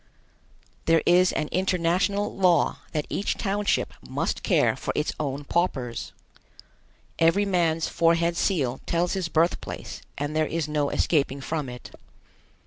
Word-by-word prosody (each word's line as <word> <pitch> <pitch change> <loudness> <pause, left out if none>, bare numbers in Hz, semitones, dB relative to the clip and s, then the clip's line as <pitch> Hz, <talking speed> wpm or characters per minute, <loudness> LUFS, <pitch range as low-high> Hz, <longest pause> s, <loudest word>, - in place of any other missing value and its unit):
There 165 -1 +4
is 180 +1 +5
an 150 - -2
international 185 +2 0
law 180 -5 +3
that 150 -2 -2
each 200 - -2
township 205 0 0
must - - -3
care - - +2
for - - -3
its - - 0
own 140 -1 -3
paupers. 135 -7 -1 1.1
Every 165 +5 +4
man's 165 -4 +1
forehead 170 0 +2
seal 140 -10 0
tells 170 +1 +1
his 185 -3 -2
birthplace 165 +2 -1 0.2
and 145 +2 -3
there 155 -1 +2
is 165 -2 -2
no 150 -2 0
escaping 140 -3 +1
from 150 -1 -3
it. 125 0 -10
165 Hz, 135 wpm, -25 LUFS, 150-180 Hz, 1.1 s, is